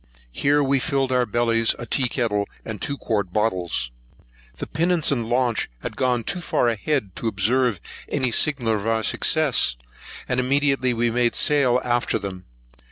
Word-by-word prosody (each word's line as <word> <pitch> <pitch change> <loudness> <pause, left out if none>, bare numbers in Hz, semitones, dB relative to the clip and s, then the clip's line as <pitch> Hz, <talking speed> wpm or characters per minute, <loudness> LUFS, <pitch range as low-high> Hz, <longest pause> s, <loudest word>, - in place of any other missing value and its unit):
Here 145 - +2
we 135 0 +2
filled 135 -1 0
our 125 -1 +2
bellies, 115 0 +1
a 120 - -7
tea 130 +1 +1
kettle, 105 -6 -1 0.2
and 110 -3 -6
two 140 - -3
quart 100 -8 -2
bottles. 90 - -1 0.7
The - - -4
pinnace 170 -2 +1
and 120 -5 -1
launch 120 -2 0
had - - -5
gone 125 -2 0
too 180 - -3
far 125 - +1
ahead 115 -2 -2
to 115 - -3
observe 110 +1 +1 0.3
any 130 -4 0
signal 125 -5 +1
of 105 0 -2
our 110 0 +1
success; 150 - +2 0.5
and 125 - 0
immediately 135 0 +1
we 120 0 0
made 120 0 +1
sail 135 -4 +3
after 120 -1 0
them. 95 -2 -7
120 Hz, 165 wpm, -23 LUFS, 110-135 Hz, 0.7 s, sail